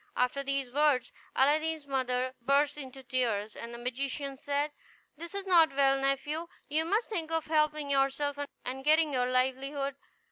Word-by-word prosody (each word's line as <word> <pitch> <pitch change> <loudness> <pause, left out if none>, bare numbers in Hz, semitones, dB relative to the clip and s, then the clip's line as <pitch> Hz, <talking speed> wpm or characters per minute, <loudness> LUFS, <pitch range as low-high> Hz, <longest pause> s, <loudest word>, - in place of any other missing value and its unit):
After 250 +3 +1
these 275 -2 -2
words 280 -3 +2 0.2
Aladdin's 310 +2 +2
mother 255 -2 -1
burst 280 +3 +2
into 270 -2 -9
tears; 225 -5 -1
and 235 - -7
the 235 - -7
magician 270 +3 -3
said, 285 +2 -1 0.4
"This 340 +5 -9
is 395 -1 -3
not 335 -6 +5
well, 275 -1 +4
nephew; 290 +4 -1 0.2
you 310 +2 0
must 430 +7 0
think 335 -6 -2
of 325 -1 -1
helping 305 -2 +1
yourself, 275 +1 +1 0.3
and 265 +1 -4
getting 310 0 +4
your 250 -1 +1
livelihood. 270 +2 0
275 Hz, 155 wpm, -30 LUFS, 260-305 Hz, 0.4 s, not